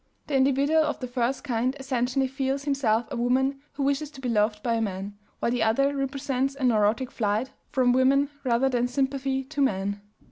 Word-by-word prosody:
The 290 - -2
individual 280 +4 +3
of 305 -1 -1
the 255 - -4
first 245 +1 -1
kind 255 0 0
essentially 260 0 0
feels 270 +1 -2
himself 250 -6 +1
a - - -3
woman 265 +3 +1
who 280 - -3
wishes 280 +2 0
to 290 - -13
be 255 -2 -3
loved 210 -1 +1
by 235 - +1
a 225 - 0
man, 200 -1 -4 0.2
while 235 - 0
the 245 - 0
other 275 +6 +2
represents 275 0 -1
a 275 - -6
neurotic 230 +1 +2
flight 215 +3 -1 0.2
from 250 -2 +3
women 275 +3 +3
rather 250 0 +2
than 245 -2 +1
sympathy 270 +1 -1
to 285 +2 -4
men." 200 -5 0
260 Hz, 190 wpm, -26 LUFS, 235-275 Hz, 0.2 s, individual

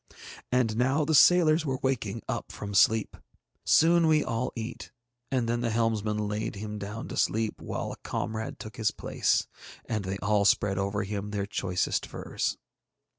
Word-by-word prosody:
And 120 -3 +1
now 135 +5 +2
the 160 - 0
sailors 160 0 +6
were 135 -4 -1
waking 115 -5 -1
up - - -4
from 100 -1 -6
sleep. 110 +2 +3 0.5
Soon 170 +1 +5
we 155 -1 +4
all 120 0 -2
eat, 115 +1 -6 0.4
and 125 -3 +1
then 120 +1 0
the 120 - 0
helmsman 110 -2 0
laid 105 +1 -3
him 105 +1 -5
down 105 +3 -6
to - - -5
sleep 110 0 0
while - - -4
a - - -8
comrade 110 0 -4
took 110 +4 -9
his 110 -2 +2
place, - - 0 0.4
and 110 -3 -2
they 95 +1 -3
all 105 +1 +1
spread 100 -1 +3
over 100 +2 -1
him 105 0 -4
their 100 -1 -2
choicest 90 -2 -1
furs. - - -3
110 Hz, 170 wpm, -28 LUFS, 105-125 Hz, 0.5 s, sailors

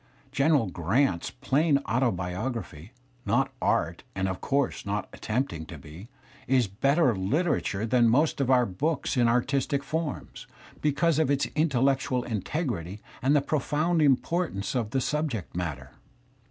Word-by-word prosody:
General 140 -5 +3
Grajit 90 - +1
^ - - -6
plain 145 +1 +3
autobi 100 -6 0
ography, 100 - -5 0.3
not 135 +3 +1
art 85 +2 0
and 95 0 0
of 95 -1 -4
course 140 -2 0
not 100 +1 -2
at - - -13
tempting 110 - -2
to 85 - -8
be, 80 - -12 0.4
is 130 -2 +3
better 135 - +2
Uterature 110 - 0
than 120 0 +4
most 145 +4 +2
of 130 - 0
our 125 -2 +5
books 145 - -1
in 120 -2 +3
artistic 140 +4 +1
forms, 160 0 -4 0.3
because 150 +2 +2
of 155 - +2
its 140 -1 +2
intellectual 135 -4 +1
integrity 105 - -3 0.2
and 135 +4 +3
the 145 - +4
profound 155 +3 0
importance 145 - +1
of 120 -5 -1
the 120 - -1
subjeict 135 - -2
matter. 70 -7 -4
125 Hz, 145 wpm, -27 LUFS, 100-145 Hz, 0.4 s, our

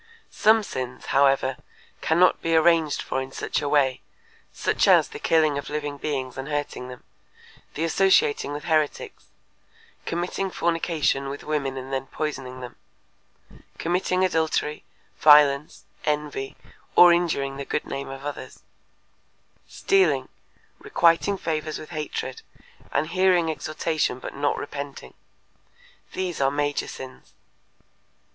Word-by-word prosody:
Some 220 0 +4
sins, 130 -9 -6
however, 135 -1 +3 0.4
cannot 175 +3 +3
be 165 0 +1
arranged 160 -2 +3
for 130 - -2
in 130 0 -7
such - - -2
a 145 - -2
way, 135 -3 +2 0.5
such - - 0
as - - +6
the 440 - -8
killing 155 - +2
of 145 - -8
living 145 -1 -4
beings 130 -4 -3
and 135 - -5
hurting 145 -4 -3
them; 125 -1 -11 0.7
the 155 - -2
associating 165 -4 +3
with 145 0 -5
heretics; 155 -3 -1 0.8
committing 180 +3 -2
fornication 165 -6 0
with 140 - -7
women 140 -3 -2
and 130 +1 -7
then 135 0 -2
poisoning 135 -4 -5
them; 125 -1 -9 1.0
committing 185 +2 +1
adultery, 160 -3 -1 0.4
violence, 150 -1 +5 0.2
envy, 150 -3 -2 0.4
or 175 -1 +9
injuring 140 -6 0
the 140 - -4
good 150 - -3
name 135 0 -5
of 135 +1 -8
others; 145 - -7 1.0
stealing, 390 -2 +2 0.5
requiting 195 - +2
favors 155 -3 -3
with 155 - -10
hatred, 150 -4 -4 0.5
and 155 - 0
hearing 180 -2 +3
exhortation 155 -3 -2
but 130 - -8
not 145 +1 0
repenting. 145 -1 -7 1.0
These 180 -5 -3
are 135 - +4
major 145 +1 -1
sins. 130 -1 -10
150 Hz, 125 wpm, -24 LUFS, 135-165 Hz, 1.0 s, or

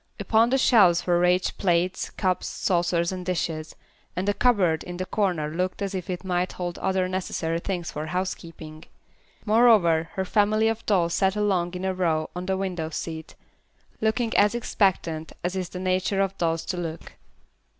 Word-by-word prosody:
Upon 225 +1 +3
the 265 - +2
shelves 190 -10 +5
were 175 -1 +3
ranged 180 +1 +1
plates, 180 0 +1
cups, 185 -2 -1
saucers 175 -1 0
and 185 -1 -5
dishes, 165 -3 -3 0.4
and 185 +2 -2
a 205 - +3
cupboard 195 -10 +2
in 175 0 -7
the 185 - -3
corner 180 -8 0
looked 180 +3 -2
as 200 -1 -3
if 185 -2 -5
it 180 0 -4
might 180 -1 -1
hold 175 -1 -5
other 190 -1 0
necessary 180 -3 -2
things 175 -2 -4
for 155 +1 -5
housekeeping. 165 -3 -5 0.6
Moreover, 210 -8 +4
her 190 - -2
family 215 +3 +2
of 225 0 -3
dolls 175 -5 +2
sat 190 0 +2
along 185 -4 0
in 180 +1 -4
a 190 - 0
row 165 -4 0
on 180 +1 -5
the 190 0 0
window 180 -4 -3
seat, 160 0 -6 0.7
looking 225 +1 0
as 205 +3 +4
expectant 175 -8 0
as 180 +2 -2
is 185 -2 -3
the - - -8
nature 185 +1 0
of 195 0 -1
dolls 165 -1 0
to 185 - -3
look. 165 -2 -6
185 Hz, 175 wpm, -25 LUFS, 170-195 Hz, 0.7 s, shelves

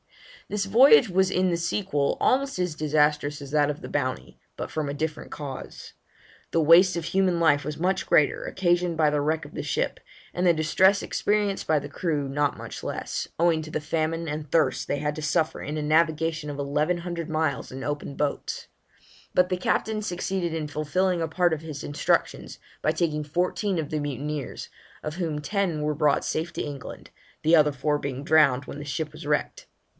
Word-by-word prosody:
This 205 -1 -1
voyage 230 +3 +7
was 190 +1 +2
in 185 0 +2
the 170 - +1
sequel 170 -4 0
almost 275 -4 +1
as 180 -4 -1
disastrous 150 -1 +1
as 140 -1 -9
that 150 -1 +3
of 150 - -4
the - - -7
Bounty, 130 -3 -3 0.2
but - - -5
from 155 -2 -2
a - - -3
different 155 +1 -4
cause. 140 -3 -8 0.6
The 165 - +1
waste 170 +4 +6
of 165 - -3
human 185 -1 +1
life 145 -3 +3
was 150 +2 -5
much 185 +3 0
greater, 150 - +3
occasioned 175 -2 0
by 155 -2 +3
the 150 -1 +1
wreck 155 +1 0
of 145 - -12
the - - -4
ship, - - -1 0.3
and 180 - -1
the 175 - +6
distress 190 +6 +3
experienced 205 -2 0
by 155 - +3
the 145 - -7
crew 145 -1 -2
not 145 +1 0
much - - -8
less, - - -4
owing 165 -2 +3
to 155 0 -8
the - - -1
famine 165 +2 -2
and 150 -1 -5
thirst 150 -6 +2
they 145 - -1
had 150 +1 -2
to 155 - -5
suffer 155 +1 0
in 150 +1 -4
a 150 - -2
navigation 160 0 +1
of 145 - -5
eleven 150 +5 0
hundred 170 -2 -5
miles 155 -3 -1
in 130 +1 -7
open 145 -1 -4
boats; 145 -1 -3 0.7
but 180 0 +5
the 185 - +1
Captain 215 +4 0
succeeded 185 -2 -2
in 160 -2 -2
fulfilling 170 +5 0
a 165 - 0
part 175 +1 +2
of 155 - -3
his 155 -3 -7
instructions, 145 - -1 0.2
by - - +2
taking 150 -3 -1
fourteen 180 +5 -1
of 155 -3 -2
the 155 - -1
mutineers, 145 0 -4 0.4
of 150 0 -4
whom 165 -4 -2
ten 175 -1 -1
were 150 0 0
brought 150 -1 +2
safe 160 +2 -2
to - - -4
England, 140 -3 -8 0.3
the 160 +2 +5
other 150 -2 +5
four 145 +2 0
being 140 -1 -4
drowned 145 -4 +4
when 145 - -8
the - - -6
ship 150 +1 -4
was 155 +1 -10
wrecked. 150 -1 -1
155 Hz, 200 wpm, -26 LUFS, 150-175 Hz, 0.7 s, voyage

